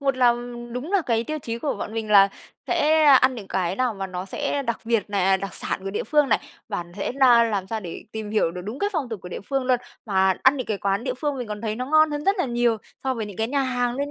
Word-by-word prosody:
một 275 -2 +1
là 245 -2 +5 0.4
đúng 265 +9 -5
là 395 -3 +3
cái 230 -1 +1
tiêu 310 +3 -3
chí 230 -5 -5
của 280 +3 -2
bọn - - -6
mình 220 -1 -3
là 195 -1 +7 0.4
sẽ 310 +1 +3
ăn 265 -2 +6
những 210 -5 -9
cái 185 0 -1
nào 250 -3 0
mà 195 -1 -4
nó 185 0 -5
sẽ 280 +8 -2
đặc 235 -3 -2
biệt 225 -3 0
này, 195 -2 +1
à, 190 0 +4
đặc 195 +1 -6
sản - - -3
của 195 - -3
địa 200 - -3
phương 295 +3 +3
này, - - +4 0.3
và 175 - -3
thể 200 +4 -3
na 255 -3 +6
làm 205 -4 -1
sao 220 +2 -3
để 175 -5 -8
tìm 220 -1 -5
hiểu 210 -6 +2
được 180 +1 -7
đúng 215 +7 -5
cái 405 - 0
phong 305 -8 -2
tục 225 -4 -5
của 180 - -7
địa - - -6
phương 270 +5 -2
luôn. 255 -1 +3 0.3
Mà 190 -2 +3
ăn 265 +2 +5
những 255 - -4
cái 210 -2 -2
quán 200 +3 -1
địa 255 -2 -1
phương 285 +1 -2
mình 245 -3 -5
còn 210 -1 -5
thấy 220 -1 -3
nó 255 +2 -3
ngon 310 +1 +4
hơn 295 0 -3
rất 395 +1 +3
là 360 - +2
nhiều 240 -2 +1 0.3
so 265 -1 +1
với 225 -3 -4
những 205 -3 -9
cái 225 +1 -1
nhà 280 0 +1
hàng 245 -2 0
luôn 285 +1 -2
235 Hz, 295 wpm, -24 LUFS, 205-270 Hz, 0.4 s, là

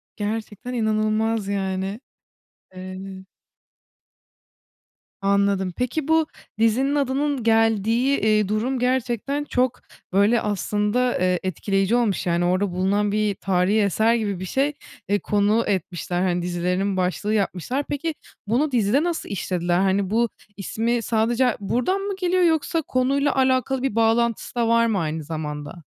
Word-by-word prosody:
Gerçekten 220 +3 -4
inanılmaz, 220 -1 0
yani. 195 +1 -2 0.7
Evet. 190 +1 -9 1.9
Anladım, 200 -2 +1
peki, 270 +4 -2
bu 320 -1 +3 0.3
dizinin 260 +6 +2
adının 280 -1 0
geldiği, 225 +3 +2
eee, 215 -2 +2
durum 235 +5 -1
gerçekten 255 +3 -1
çok, 250 -3 0 0.3
böyle, 205 +4 +4
aslında, 210 +4 0
eee, 180 -1 +1
etkileyici 195 +4 0
olmuş. 225 -7 +1
Yani, 175 0 +1
orada 185 +2 +1
bulunan 200 +3 +1
bir 210 -1 0
tarihî 195 +3 +1
eser 220 +4 +2
gibi 205 -5 -2
bir 185 - -5
şey, 275 +9 0 0.4
eee, 205 0 +2
konu 210 +2 +2
etmişler. 180 -2 -2
Hani, 180 -2 +1
dizilerinin 180 +2 -1
başlığı 185 +4 -1
yapmışlar. 215 - -1
Peki, 310 +3 -2 0.3
bunu 270 +7 +1
dizide 235 +4 +2
nasıl 345 -1 -2
işlediler? 175 -3 -1
Hani, 190 0 +1
bu 230 +1 +2 0.3
ismi 230 +4 -1
sadece 230 +3 +1
ha 245 - +1
buradan 250 - 0
mı 400 0 -3
geliyor 365 0 +2
yoksa 325 0 +2
konuyla 275 +2 +1
alakalı 260 0 +1
bir 265 -5 -1
bağlantısı 230 +1 +1
da 235 -1 +1
var 230 0 +4
mı, 215 -4 +1
aynı 155 -1 -3
zamanda? 150 +1 -6
215 Hz, 135 wpm, -23 LUFS, 190-250 Hz, 1.9 s, böyle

